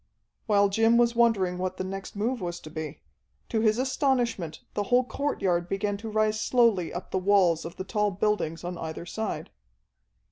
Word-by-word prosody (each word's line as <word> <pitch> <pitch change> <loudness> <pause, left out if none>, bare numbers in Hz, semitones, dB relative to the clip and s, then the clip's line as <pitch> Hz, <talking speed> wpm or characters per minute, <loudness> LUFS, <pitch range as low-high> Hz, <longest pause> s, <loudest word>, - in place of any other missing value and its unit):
While 205 -2 +4
Jim 225 +3 +4
was 235 0 +3
wondering 200 -7 +2
what 185 0 -2
the - - -2
next 195 +2 -6
move 230 +3 -1
was 175 -1 -4
to 155 - -10
be, 155 -1 -6 0.5
to 220 - 0
his 215 0 +3
astonishment 245 - 0
the 205 - -1
whole 250 +1 +5
courtyard 190 -11 -1
began 200 +1 -1
to 220 +2 -7
rise 215 0 +1
slowly 230 -8 +3
up 175 - -7
the 190 - +1
walls 185 -4 +3
of 165 - -7
the - - -5
tall 210 +1 0
buildings 195 -5 -1
on 175 0 -5
either 160 +1 -5
side. 220 +5 -4
205 Hz, 180 wpm, -27 LUFS, 180-225 Hz, 0.5 s, whole